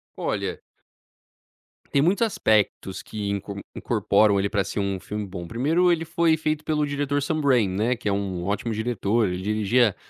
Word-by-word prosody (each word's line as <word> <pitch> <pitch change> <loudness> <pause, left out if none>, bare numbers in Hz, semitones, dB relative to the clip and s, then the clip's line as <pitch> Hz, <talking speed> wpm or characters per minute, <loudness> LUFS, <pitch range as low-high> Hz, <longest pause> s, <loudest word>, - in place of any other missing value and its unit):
Olha - - -2 1.3
Tem 140 - +3
muitos 195 +8 +3
aspectos 105 - 0
que 105 -2 -4
in 100 -1 -1 0.3
incorporam 105 -2 +2
ele 100 +1 0
pra 100 -2 +1
ser - - -4
um 100 -1 -1
filme 105 +2 -5
bom. 90 -3 -7
Primeiro, 160 - +2
ele 165 -1 0
foi 165 0 +2
feito 155 0 -1
pelo 150 -1 +1
diretor 145 0 -1
Sunbrain, 140 -7 +2
né, 110 +7 0
que 115 - -6
é - - +1
um 95 -3 -2
ótimo 105 +4 -2
diretor, 110 -1 0
ele 90 0 -3
dirigia 105 +2 +2
110 Hz, 165 wpm, -24 LUFS, 100-145 Hz, 1.3 s, Tem